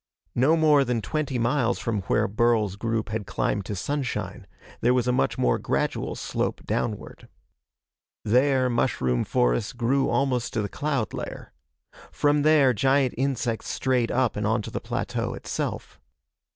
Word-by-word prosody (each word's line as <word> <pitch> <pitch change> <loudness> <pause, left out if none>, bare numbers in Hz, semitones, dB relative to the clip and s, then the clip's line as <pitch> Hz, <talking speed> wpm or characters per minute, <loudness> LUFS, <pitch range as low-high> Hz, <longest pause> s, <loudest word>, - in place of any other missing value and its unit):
No 140 +7 +3
more 150 -3 +5
than 125 -2 -1
twenty 130 +6 -2
miles 120 +1 +1
from 110 -4 -2
where 105 +1 +2
Burl's 110 -2 +1
group 110 0 -2
had 105 -2 -4
climbed 100 -2 -1
to 105 - -3
sunshine, 135 +7 -3 0.3
there 125 +2 +3
was 125 -1 +1
a - - +3
much 125 - 0
more - - +2
gradual - - -1
slope - - -3
downward. 110 -3 -3 1.0
There, 130 +3 +3
mushroom 65 - 0
forests - - +1
grew 125 +3 +1
almost 130 -3 0
to 110 -4 0
the 100 - -3
cloud 145 -6 -2
layer. - - -7 0.6
From 145 0 +2
there, 145 -4 +5
giant 135 +3 +2
insects 125 -3 -1
strayed 125 -3 0
up 130 -3 +1
and 105 0 -1
onto 110 -1 -1
the - - -4
plateau - - -3
itself. - - -5
120 Hz, 150 wpm, -25 LUFS, 110-135 Hz, 1.0 s, more